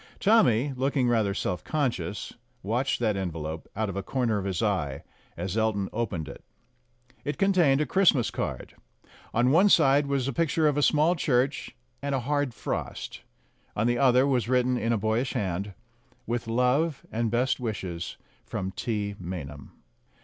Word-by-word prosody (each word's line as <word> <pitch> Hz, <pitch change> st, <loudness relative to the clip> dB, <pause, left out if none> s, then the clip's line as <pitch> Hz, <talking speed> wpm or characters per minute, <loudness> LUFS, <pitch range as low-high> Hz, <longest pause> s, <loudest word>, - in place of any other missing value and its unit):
Tommy, 145 Hz, -, +4 dB
looking 130 Hz, 0 st, +1 dB
rather 110 Hz, -5 st, +1 dB
self 90 Hz, -2 st, -2 dB
conscious, 130 Hz, -9 st, -2 dB, 0.3 s
watched 120 Hz, +6 st, 0 dB
that 110 Hz, -4 st, +1 dB
envelope 80 Hz, -4 st, -4 dB
out 110 Hz, +1 st, -1 dB
of 100 Hz, -, -5 dB
a 100 Hz, -, -2 dB
corner 115 Hz, 0 st, 0 dB
of 95 Hz, -, -5 dB
his 95 Hz, -1 st, -1 dB
eye 85 Hz, -10 st, -1 dB, 0.3 s
as 90 Hz, +3 st, -3 dB
Elton 110 Hz, -3 st, 0 dB
opened 95 Hz, -9 st, -2 dB
it. 70 Hz, -, -10 dB, 0.8 s
It 145 Hz, -, -3 dB
contained 175 Hz, -8 st, +3 dB
a -, -, +1 dB
Christmas 155 Hz, -6 st, +3 dB
card. -, -, -4 dB, 0.6 s
On 120 Hz, +3 st, +2 dB
one 185 Hz, +7 st, +5 dB
side 145 Hz, -5 st, +5 dB
was 135 Hz, -2 st, 0 dB
a 140 Hz, -, -2 dB
picture 160 Hz, +1 st, +2 dB
of 145 Hz, -, +2 dB
a 145 Hz, -, +1 dB
small 155 Hz, +4 st, +3 dB
church 135 Hz, -4 st, 0 dB, 0.3 s
and 140 Hz, 0 st, -1 dB
a 130 Hz, -, -1 dB
hard 145 Hz, +1 st, 0 dB
frost; -, -, -5 dB, 0.5 s
on 105 Hz, -, 0 dB
the 120 Hz, 0 st, +1 dB
other 130 Hz, -1 st, +5 dB
was 125 Hz, -5 st, +1 dB
written, 125 Hz, 0 st, +2 dB
in 115 Hz, -1 st, 0 dB
a 115 Hz, -, +2 dB
boyish 110 Hz, +5 st, 0 dB
hand, 100 Hz, -3 st, -3 dB, 0.5 s
"With 120 Hz, 0 st, -3 dB
love 125 Hz, +6 st, +1 dB
and 115 Hz, 0 st, 0 dB
best 125 Hz, +4 st, +1 dB
wishes 95 Hz, -8 st, -4 dB, 0.3 s
from 95 Hz, 0 st, -4 dB
T. 105 Hz, +1 st, -3 dB
Maynham." 75 Hz, -6 st, -7 dB
120 Hz, 165 wpm, -27 LUFS, 100-140 Hz, 0.8 s, one